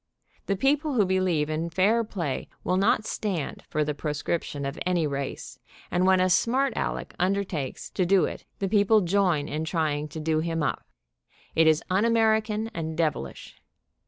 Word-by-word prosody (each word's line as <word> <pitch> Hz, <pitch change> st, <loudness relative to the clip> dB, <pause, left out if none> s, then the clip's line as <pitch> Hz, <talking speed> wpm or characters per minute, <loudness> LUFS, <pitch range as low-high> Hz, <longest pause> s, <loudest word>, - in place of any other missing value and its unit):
The 195 Hz, -, +1 dB
people 285 Hz, -, +1 dB
who 210 Hz, -4 st, +4 dB
believe 185 Hz, -5 st, +1 dB
in 155 Hz, +2 st, -2 dB
fair 200 Hz, +7 st, +3 dB
play 170 Hz, -11 st, -3 dB, 0.2 s
will 185 Hz, -, +1 dB
not 210 Hz, +2 st, +2 dB
stand 190 Hz, -11 st, -3 dB
for 155 Hz, -, +1 dB
the 150 Hz, 0 st, -2 dB
proscription 145 Hz, 0 st, -3 dB
of 140 Hz, +3 st, -4 dB
any 180 Hz, -3 st, +1 dB
race, 140 Hz, -2 st, -4 dB, 0.3 s
and 180 Hz, +1 st, +2 dB
when 190 Hz, 0 st, +5 dB
a 185 Hz, -, +3 dB
smart 255 Hz, +8 st, +2 dB
Aleck -, -, -3 dB
undertakes 185 Hz, -7 st, -1 dB
to 185 Hz, -, 0 dB
do 180 Hz, -2 st, +4 dB
it, -, -, -6 dB
the 195 Hz, -, -1 dB
people 210 Hz, +1 st, +4 dB
join 180 Hz, -5 st, +1 dB
in 155 Hz, +1 st, -3 dB
trying 155 Hz, -2 st, -1 dB
to 150 Hz, +2 st, -7 dB
do 155 Hz, 0 st, +1 dB
him 165 Hz, -1 st, -1 dB
up. -, -, -2 dB, 0.7 s
It 160 Hz, 0 st, +4 dB
is 155 Hz, 0 st, +4 dB
un 190 Hz, +3 st, +3 dB
American, 220 Hz, -1 st, +2 dB
and 160 Hz, -1 st, -4 dB
devilish. 150 Hz, -, -3 dB
180 Hz, 170 wpm, -26 LUFS, 155-200 Hz, 0.7 s, when